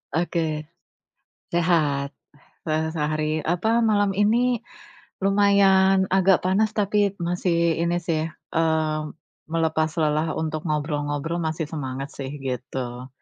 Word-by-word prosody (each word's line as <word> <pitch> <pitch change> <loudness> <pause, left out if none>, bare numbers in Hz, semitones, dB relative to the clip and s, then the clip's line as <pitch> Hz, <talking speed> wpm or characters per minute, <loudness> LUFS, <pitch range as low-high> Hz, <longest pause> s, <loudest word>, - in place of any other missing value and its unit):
Oke. 160 -3 -1 0.9
Sehat, 155 -5 +1 0.6
se 155 - +1 0.2
sehari 155 0 -1
apa, 205 +8 +1
malam 205 -3 +2
ini 230 +5 +2 0.6
lumayan 195 -1 +4
agak 190 -1 +4
panas 205 +3 +2
tapi 205 -1 +1
masih 170 -1 +1
ini 170 +1 +1
sih, 160 -2 -1 0.3
eee, 160 -1 +1 0.5
melepas 160 -1 +1
lelah, 155 +1 +1
untuk 155 0 -3
ngobrol-ngobrol 150 +1 -2
masih 160 0 -2
semangat 135 -3 -5
sih, 135 -1 -6
gitu. 125 -1 -5
165 Hz, 105 wpm, -24 LUFS, 155-190 Hz, 0.9 s, lumayan